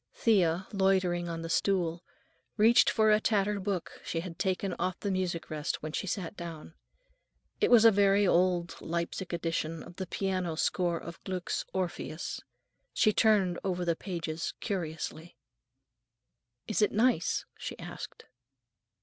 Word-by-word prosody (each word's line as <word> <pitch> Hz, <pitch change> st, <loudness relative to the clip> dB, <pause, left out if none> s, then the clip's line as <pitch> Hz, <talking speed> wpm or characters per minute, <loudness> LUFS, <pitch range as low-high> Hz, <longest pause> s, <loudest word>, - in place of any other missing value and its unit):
Thea, 190 Hz, -5 st, +2 dB
loitering 185 Hz, -3 st, +2 dB
on 165 Hz, 0 st, -4 dB
the -, -, -4 dB
stool, 175 Hz, -2 st, +1 dB, 0.5 s
reached 225 Hz, +3 st, +6 dB
for 220 Hz, -1 st, +3 dB
a 210 Hz, -, +5 dB
tattered 205 Hz, -2 st, +1 dB
book 190 Hz, -4 st, -3 dB
she 165 Hz, -, -2 dB
had 170 Hz, -2 st, -8 dB
taken 190 Hz, 0 st, 0 dB
off 185 Hz, -1 st, -1 dB
the 200 Hz, -, -2 dB
music 180 Hz, -4 st, -2 dB
rest 150 Hz, -1 st, -3 dB
when 155 Hz, -, -4 dB
she 195 Hz, -, -3 dB
sat 180 Hz, 0 st, -3 dB
down. 165 Hz, -3 st, -8 dB, 0.9 s
It -, -, +3 dB
was 235 Hz, -2 st, +7 dB
a 225 Hz, -, +9 dB
very 200 Hz, 0 st, +4 dB
old 180 Hz, -1 st, +2 dB
Leipsic 170 Hz, +2 st, -3 dB
edition 165 Hz, -1 st, -2 dB
of 175 Hz, -, -13 dB
the 190 Hz, -, -4 dB
piano 185 Hz, -3 st, -1 dB
score 175 Hz, +1 st, +1 dB
of 170 Hz, +1 st, -9 dB
Gluck's 185 Hz, -2 st, -3 dB
"Orpheus." 175 Hz, -3 st, -3 dB, 0.5 s
She 215 Hz, -, +4 dB
turned 200 Hz, -6 st, +3 dB
over 180 Hz, -2 st, -1 dB
the 170 Hz, -1 st, +1 dB
pages 165 Hz, -3 st, -4 dB
curiously. 165 Hz, -3 st, -4 dB, 1.3 s
"Is 215 Hz, -, 0 dB
it 210 Hz, -, +4 dB
nice?" 220 Hz, -6 st, +2 dB
she -, -, -6 dB
asked. -, -, -8 dB
180 Hz, 145 wpm, -30 LUFS, 170-195 Hz, 1.3 s, a